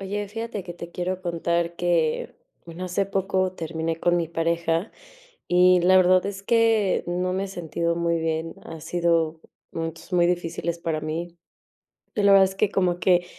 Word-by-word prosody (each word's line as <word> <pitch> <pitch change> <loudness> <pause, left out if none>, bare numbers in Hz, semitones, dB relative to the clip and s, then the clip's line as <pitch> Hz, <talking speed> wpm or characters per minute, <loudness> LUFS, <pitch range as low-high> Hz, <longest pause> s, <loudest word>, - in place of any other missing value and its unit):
Oye, 205 +1 -4
fíjate 225 -1 -5
que 175 -1 -8
te 170 0 -9
quiero 185 +1 -3
contar 170 0 -1
que, 170 -3 0 0.3
bueno, 170 +2 -7
hace 185 +2 0
poco 190 -1 0
terminé 165 -1 -3
con 175 +1 +2
mi 170 -2 -1
pareja, 165 +2 -1 0.6
y 180 0 +5
la 185 +2 +5
verdad 185 0 +5
es 195 -1 -5
que 225 -3 +2
no 180 +1 -1
me 190 +1 -1
he - - -6
sentido 170 -2 -2
muy 170 0 0
bien, 160 0 -2
ha 160 -1 -8
sido 165 -1 0 0.3
momentos 165 +2 -6
muy 175 -1 +4
difíciles 170 -1 -2
para 165 -2 -2
mí. 165 +3 -5 0.8
Y 210 - 0
la 200 0 +6
verdad 195 -1 +8
es 190 0 -5
que 210 +1 +2
como 180 -3 +1
que 175 -1 +3
175 Hz, 175 wpm, -24 LUFS, 165-185 Hz, 0.8 s, verdad